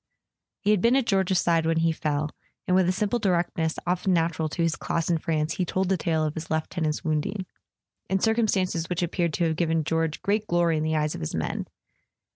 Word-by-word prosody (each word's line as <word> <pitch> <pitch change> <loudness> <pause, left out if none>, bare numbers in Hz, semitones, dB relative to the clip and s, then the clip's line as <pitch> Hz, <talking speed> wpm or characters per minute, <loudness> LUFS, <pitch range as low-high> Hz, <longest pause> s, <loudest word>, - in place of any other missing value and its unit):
He 210 - +2
had 210 -4 +3
been 235 +4 +4
at 270 -3 +2
George's 190 -3 +2
side 165 -1 +2
when 165 0 +2
he 165 0 +3
fell, 150 -1 -1 0.3
and 180 - +2
with 185 -1 +4
the - - +3
simple 210 +5 0
directness 170 -4 0
often 180 +1 +1
nat¬ 165 -1 +1
ural 160 -1 -1
to 170 +3 -2
his 165 -2 +1
class 165 +1 -1
in 165 - +2
France 155 0 -1
he 185 - +1
told 185 +2 -1
the 190 - +3
tale 160 -2 0
of 155 -1 -1
his 160 +1 -6
lieu¬ 160 0 0
tenant's 155 -3 -1
wounding, 160 +5 -1 0.6
in 190 +1 +2
circumstances 195 -6 +1
which 180 0 -1
appeared 170 -1 -1
to 170 - 0
have 160 -1 +1
given 165 -2 +1
George 160 0 -1
great 210 +1 0
glory 175 -1 +2
in 155 - -1
the 155 0 0
eyes 150 -1 0
of - - -7
his 80 - -3
men. - - -2
170 Hz, 230 wpm, -26 LUFS, 160-185 Hz, 0.6 s, been